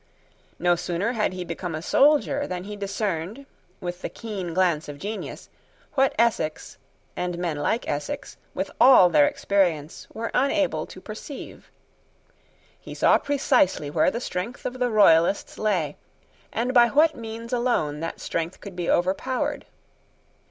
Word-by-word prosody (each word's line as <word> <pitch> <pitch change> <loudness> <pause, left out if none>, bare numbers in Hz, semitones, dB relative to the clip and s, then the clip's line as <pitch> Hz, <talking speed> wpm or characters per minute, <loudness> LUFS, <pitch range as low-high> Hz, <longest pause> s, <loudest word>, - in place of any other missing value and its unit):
No 175 0 +3
sooner 175 +5 -2
had 220 -5 0
he 185 -1 -5
become 170 0 -4
a 155 - -4
soldier 285 - +3
than 180 -1 -4
he 205 +2 -7
discerned, 200 +3 -3 0.3
with 175 0 -5
the - - -4
keen 200 -7 -6
glance 170 -4 +1
of 145 - -7
genius, 210 +7 -6 0.5
what 270 0 +2
Essex, 215 -9 0 0.4
and 180 -1 -3
men 170 -4 -2
like 220 +10 -1
Essex, 145 0 -4 0.2
with 190 +1 -3
all 240 -8 +8
their 150 -3 +5
experience, 175 -6 0
were 230 +1 -4
unable 270 - +1
to - - -11
perceive. 215 +8 -9 1.1
He - - -10
saw - - +4
precisely 250 - +1
where 155 0 +3
the 235 - -3
strength 225 0 -5
of 255 +1 -4
the 250 -1 +1
Royalists 195 -4 +4
lay, 180 -9 0 0.5
and 245 +3 -1
by 240 -2 +7
what 305 +5 +4
means 230 +1 -7
alone 235 -12 0
that 165 +1 -5
strength 165 +2 -3
could 200 -3 -10
be 175 -1 -3
overpowered. 195 +9 0
195 Hz, 145 wpm, -25 LUFS, 170-235 Hz, 1.1 s, all